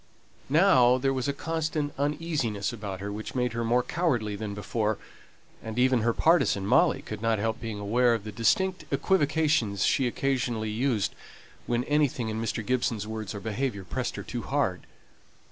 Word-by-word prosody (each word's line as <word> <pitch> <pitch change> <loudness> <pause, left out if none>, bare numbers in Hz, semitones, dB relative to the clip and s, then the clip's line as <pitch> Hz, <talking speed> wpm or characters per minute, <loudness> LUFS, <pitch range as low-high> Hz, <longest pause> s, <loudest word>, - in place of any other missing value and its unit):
Now 135 -6 +5
there 135 +1 +1
was 130 0 -2
a - - +2
constant 155 0 -2
uneasiness 140 -7 -1
about 100 -4 -6
her 100 +1 -4
which 110 +4 -6
made 125 -2 0
her 115 0 -2
more 120 +2 +2
cowardly 120 - 0
than 100 -1 -5
before; 105 +1 -1 0.6
and 110 0 -7
even 125 -1 +3
her 115 +2 +2
partisan, 135 - +3
Molly, - - +3
could 105 -1 -7
not 115 -1 +2
help 110 +2 -2
being 115 -3 -4
aware 120 +4 +3
of 110 - -5
the 105 - -6
distinct 180 - +1
equivocations 150 - +2
she 130 - +2
occasionally 120 -4 -1
used 115 -2 0 0.5
when 120 0 +1
anything 145 -5 +1
in 110 +1 -3
Mr. 115 -1 -2
Gibson's 120 -4 0
words 110 -1 -5
or - - -4
behaviour 110 0 -3
pressed - - -3
her - - -5
too - - -5
hard. - - -1
120 Hz, 170 wpm, -27 LUFS, 110-140 Hz, 0.6 s, Now